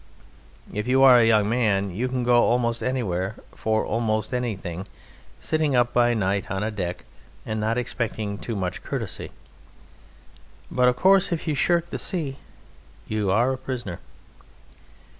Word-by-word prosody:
If 105 +2 -3
you 130 +1 +4
are 130 -2 +8
a 115 - +4
young 105 -2 +4
man 105 -4 +1
you 115 +8 -2
can 130 -1 -2
go 120 0 +5
almost 120 -1 +1
anywhere 105 -6 -1 0.2
for 110 0 0
almost 110 0 -1
anything, 95 -7 -3 0.5
sitting 155 -3 0
up 120 0 +2
by 120 -1 +3
night 100 -1 -1
on 95 0 -2
deck, 90 -4 -4 0.4
and 110 -1 -3
not 110 +2 0
expecting 110 -4 -3
too 115 - -4
much 90 -2 -3
courtesy. - - -5 1.4
But, 125 0 +3
of 125 - +3
course, 190 +6 +4
if 170 0 -2
you 155 - +1
shirk 170 +4 +1
the - - -3
sea 150 -7 -3 0.7
you 105 -2 -1
are 120 +7 +3
a 130 - -6
prisoner. 120 -9 -5
115 Hz, 150 wpm, -24 LUFS, 105-125 Hz, 1.4 s, are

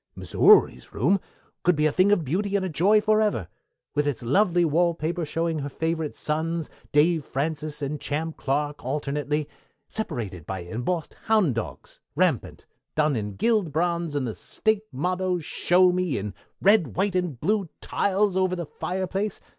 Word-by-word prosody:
Missouri's - - +4
room 175 - +3 0.4
could 180 -1 +3
be 150 - 0
made 155 - +5
a - - -3
thing 185 +6 +3
of 180 -6 +2
beauty 195 +8 -1
and 195 -1 +1
a - - -2
joy 195 +7 +4
forever, 215 - +2 0.5
with 145 0 +1
its 140 -4 -2
lovely 175 - +3
wall 170 +2 +2
paper 170 +2 -2
showing 165 +1 -1
her 145 0 -4
favorite 160 +1 -2
sons, 160 +1 -2 0.2
Dave 155 +2 +3
Francis 150 +2 -3
and 145 +1 -3
Champ 155 +2 -3
Clark 145 +2 -2
alternately, 145 +2 -2 0.4
separated 105 - -5
by 95 -1 -4
embossed 125 - -3
hound 215 - +3
dogs, 115 -1 -6 0.2
rampant, - - 0 0.3
done 150 -2 +2
in 105 -3 -3
gilt 210 - +1
bronze, 170 0 -1
and 140 -3 0
the 115 - -3
State 220 - -1
motto, 180 +6 -1
Show 180 +2 +3
Me, 180 -4 0
in 100 0 -4 0.3
red, 200 -3 +4
white, 195 +1 +1
and 180 -9 -1
blue 200 - 0
tiles 200 0 +1
over 185 -1 +2
the 175 -2 -4
fireplace. 190 +5 -3
165 Hz, 160 wpm, -25 LUFS, 145-185 Hz, 0.5 s, made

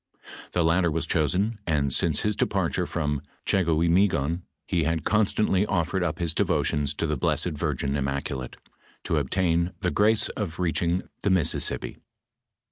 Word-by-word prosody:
The 90 - +2
latter 85 +2 +3
was 80 +1 -1
chosen, 95 +8 0
and 70 -4 +1
since 80 0 +2
his 105 0 0
departure - - 0
from 75 -3 -2 0.2
Gbegoimegon, 85 -2 +2 0.2
he 85 - 0
had 80 0 -1
constantly 105 -2 +2
offered 90 +1 0
up 85 -3 -1
his 85 -2 -1
devotions 75 -2 0
to - - -1
the 75 -1 0
blessed 80 +6 0
Virgin 70 -3 -2
Immaculate, 70 -2 -3 0.5
to - - 0
obtain 85 -1 +1
the 90 -3 0
grace 110 +1 +3
of 90 -6 -4
reach 90 -3 0
ing 85 +2 0 0.2
the 100 - +1
Mississippi. 90 -5 0
85 Hz, 145 wpm, -26 LUFS, 75-95 Hz, 0.5 s, latter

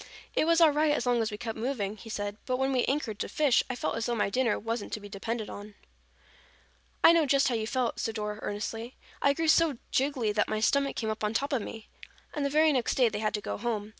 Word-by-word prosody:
"It - - +3
was 335 +1 +4
all 325 -3 +7
right 300 +1 +2
as 255 - -1
long 245 -1 +2
as 220 - 0
we 210 - -6
kept 225 0 -5
moving," 220 -5 -2
he 225 +2 -12
said, 205 -1 -4
"but 255 -1 0
when 265 +1 +1
we 255 -2 +2
anchored 260 -7 -2
to - - -3
fish, 290 -5 +3
I 255 - -2
felt - - -2
as 230 - -2
though 240 - 0
my 205 -3 0
dinner 245 -1 +1
wasn't 225 0 -4
to - - -2
be 205 - -10
depended 220 +2 -4
upon." 205 0 -9 1.3
"I - - +9
know 330 -3 +3
just 275 0 +3
how - - -1
you 220 -1 -1
felt," 250 0 -1
said 225 - -2
Dora 210 -1 -3
earnestly. 225 +4 -4 0.3
"I 280 - +4
grew 325 +2 -1
so 310 -3 +4
jiggly 260 -6 +1
that 210 0 +1
my 215 - -1
stomach 275 +5 +2
came 220 -2 -2
up 215 0 -5
on 210 +1 -1
top 280 +4 0
of 255 - +1
me." 220 +1 -8 0.5
And 295 - -2
the 280 - +1
very 310 +1 +4
next 250 -4 0
day 250 -3 +4
they 210 -1 -4
had 215 0 0
to 210 - -3
go - - -4
home. 215 -2 -2
235 Hz, 260 wpm, -29 LUFS, 215-275 Hz, 1.3 s, I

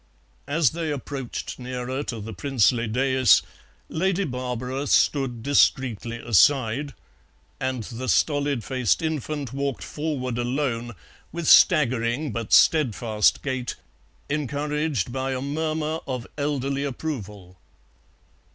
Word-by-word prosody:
As 145 -2 +2
they 165 -2 -3
approached 135 -3 -5
nearer 125 +1 -4
to 115 - -4
the 110 +2 -7
princely 120 +1 +1
daïs 130 +2 +4 0.4
Lady 190 +3 0
Barbara 125 0 -3
stood 130 -7 +2
discreetly 120 -4 +2
aside, 125 +3 +2 0.6
and 130 -3 -2
the 125 +3 -5
stolid 140 - +1
faced 125 - 0
infant 150 -4 -3
walked 140 -2 -2
forward 135 -6 -3
alone, 120 -2 -2 0.4
with 170 -1 -4
staggering 130 -2 +4
but 115 0 -5
steadfast 115 -8 +3
gait, 130 -3 -3 0.5
encouraged 150 - -1
by 135 0 -2
a - - -2
murmur 155 +2 -2
of 125 -3 -4
elderly 140 -1 -1
approval. 105 - -6
130 Hz, 105 wpm, -24 LUFS, 120-145 Hz, 0.6 s, daïs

